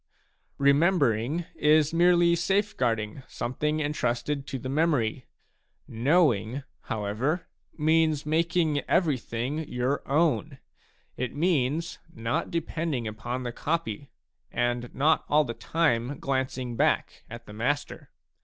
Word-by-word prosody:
Remembering 140 - +2
is 150 0 +3
merely 175 0 +5
safeguarding 135 - 0
something 150 +5 -2
entrusted 140 0 -1
to 135 - -4
the 130 - -6
memory; 135 -5 0 0.6
knowing, 130 - +2 0.2
how 105 -2 -3
ever, 135 - -1 0.3
means 155 -1 +2
making 160 -1 +1
everything 140 -4 0
your 125 +3 0
own; 150 -2 +1 0.6
it 125 +1 -3
means 155 -1 0
not 115 +6 -2
depending 160 -6 -2
upon 120 +4 -4
the 120 - -3
copy 140 -3 -3 0.4
and 120 0 -1
not 155 +4 +3
all 150 +1 +5
the 120 -5 -4
time 140 -4 0
glancing 130 -2 -2
back - - 0
at 115 +1 -9
the 105 - -11
master. 140 +7 -2
140 Hz, 110 wpm, -27 LUFS, 120-160 Hz, 0.6 s, merely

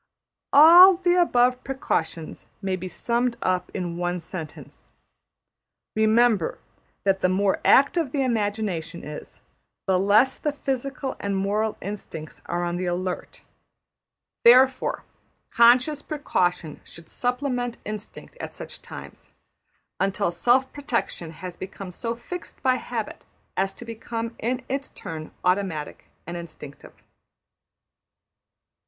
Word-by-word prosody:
All 345 +6 +9
the 350 0 +2
above 250 -5 +3
precautions 165 -11 -3
may 190 -2 -1
be 185 0 -6
summed 235 +5 -1
up 180 -1 0
in 175 -3 -4
one 175 0 -1
sentence: 160 -2 -9 1.1
Remember 220 -3 +3 0.5
that 195 -1 +2
the 185 - +3
more 195 +1 +1
active 280 +1 +4
the 275 -1 0
imagination 205 -8 -2
is, 150 0 -9 0.4
the 185 -1 +2
less 215 +7 +4
the 295 - -1
physical 270 -1 -3
and 200 -1 -2
moral 210 +3 0
instincts 175 -6 -7
are 175 0 -1
on 175 0 -2
the 180 0 -2
alert; 180 +1 -4 1.0
therefore, 255 +2 +5 0.5
conscious 250 +5 +5
precaution 180 - -1
should 170 -1 -13
supplement 245 -1 -2
instinct 215 0 -7
at - - -6
such - - -8
times, - - -11 0.7
until 195 -1 +1
self 245 +9 +2
protection 250 - -2
has 175 +2 -8
become 190 0 -8
so 230 +5 -3
fixed 355 +9 -8
by 255 -1 +3
habit 235 -3 -5 0.3
as 195 0 +1
to 240 - -10
become 230 0 -5
in 250 +3 -2
its 270 +1 -3
turn 155 -1 -7 0.2
automatic 180 -5 -1 0.2
and 170 +1 -5
instinctive. 155 -4 -11
215 Hz, 120 wpm, -25 LUFS, 180-255 Hz, 1.1 s, All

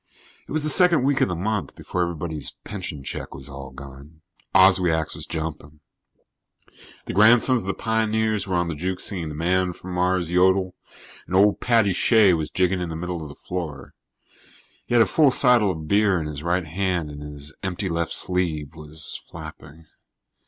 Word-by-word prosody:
It - - -13
was 155 0 -1
the 155 - +2
second 175 -5 +5
week 140 0 +1
of - - +4
the 90 - -3
month, 105 +4 -3
before 90 - -4
everybody's 80 -3 -3
pension 90 -8 -6
check - - -6
was 65 0 -8
all 70 -1 -8
gone. 70 +3 -13 0.3
Oswiak's 90 -4 +4
was - - -7
jumping. 80 -2 -6 1.3
The - - -5
Grandsons 120 +5 +5
of 95 - -9
the 95 - -1
Pioneers 110 -2 0
were 95 - -1
on 85 0 +1
the 85 - -3
juke 90 +4 -3
singing 85 -6 -1
the 75 - -7
Man 90 +3 0
from 90 +1 -9
Mars 90 -1 0
Yodel 95 +1 +3 0.5
and 95 - -3
old 100 +2 +4
Paddy 115 -5 +2
Shea 105 0 +4
was 80 -2 -2
jigging 90 0 0
in 90 - -3
the 80 - -5
middle 90 +1 -4
of 75 - -7
the 70 - -11
floor. 80 -7 -6 0.9
He 120 - 0
had 115 - +7
a - - 0
full 155 -3 +4
seidel 125 -5 +4
of 80 -4 -5
beer 100 0 +3
in 80 - -4
his 75 -1 -6
right 90 +2 0
hand 90 -1 -2
and 75 0 -9
his 75 0 -9
empty 95 +1 -3
left 85 -1 -2
sleeve 80 -6 -1
was 75 0 -6
flapping. 80 +3 -11
90 Hz, 185 wpm, -23 LUFS, 80-100 Hz, 1.3 s, had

